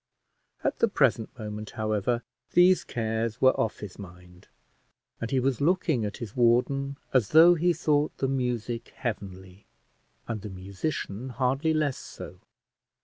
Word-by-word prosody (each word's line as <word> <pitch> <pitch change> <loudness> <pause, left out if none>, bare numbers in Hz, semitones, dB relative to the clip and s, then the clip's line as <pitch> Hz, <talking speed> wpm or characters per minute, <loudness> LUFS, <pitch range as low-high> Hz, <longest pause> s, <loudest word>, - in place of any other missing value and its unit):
At - - -1
the 230 - +4
present 130 - +2
moment, 105 -1 -6
however, 110 +2 0 0.3
these 180 +1 +5
cares 115 0 -2
were 130 - +6
off 110 - -2
his 100 -2 -8
mind, 90 -1 -13 0.7
and 115 - -4
he 135 - +1
was 130 -1 0
looking 160 - +2
at 105 - -5
his 110 -4 -7
warden, 135 +3 +2 0.2
as 125 -6 +3
though 165 +3 +8
he 175 +1 +2
thought 150 -3 +1
the 135 - 0
music 125 -3 -2
heavenly, 95 -5 -6 0.6
and 110 -3 -3
the 105 - -7
musician 100 +5 -4
hardly 130 +5 0
less 150 -4 0
so. - - -10
120 Hz, 145 wpm, -27 LUFS, 105-140 Hz, 0.7 s, though